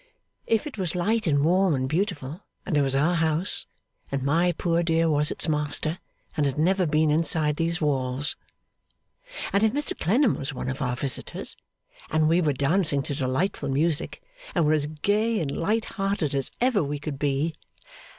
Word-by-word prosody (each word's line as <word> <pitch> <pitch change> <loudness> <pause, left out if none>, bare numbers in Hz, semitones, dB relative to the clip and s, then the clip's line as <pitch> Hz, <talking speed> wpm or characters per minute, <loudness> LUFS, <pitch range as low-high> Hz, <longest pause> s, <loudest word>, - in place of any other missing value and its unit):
'If 225 +5 +1
it 280 -8 -7
was 180 -3 -2
light 215 +4 0
and 145 -2 +2
warm 185 -1 +3
and 130 0 -1
beautiful, 155 -1 -2 0.2
and 170 - -1
it 145 - +4
was 135 -1 +1
our 150 +6 +2
house, 165 +2 +1 0.4
and 140 -1 -2
my 165 +6 +2
poor 170 0 0
dear 165 -1 +2
was 150 0 +2
its - - -1
master, 155 +2 -1 0.4
and 145 -2 +1
had 135 - -3
never 180 +3 +2
been 155 0 +2
inside 155 -1 +2
these 165 +1 0
walls. 135 -2 0 1.2
And 200 - +3
if 220 -1 +3
Mr 290 +1 -1
Clennam 230 - +2
was 135 0 -5
one 130 - -4
of 130 +2 -5
our 125 -2 -1
visitors, 135 +1 +1 0.5
and 155 0 +2
we 170 +3 +3
were 155 -3 +2
dancing 140 +1 +1
to 145 - -3
delightful 135 +6 -1
music, 150 +3 -1 0.3
and 170 -4 +3
were 150 - +3
all - - +4
as 145 -1 +1
gay 205 +9 0
and 145 -4 -3
light 215 +6 0
hearted 195 -8 -1
as 135 -1 +1
ever 240 -7 +2
we 145 +1 -3
could 145 -1 -6
be! 145 +3 0
155 Hz, 185 wpm, -25 LUFS, 145-180 Hz, 1.2 s, it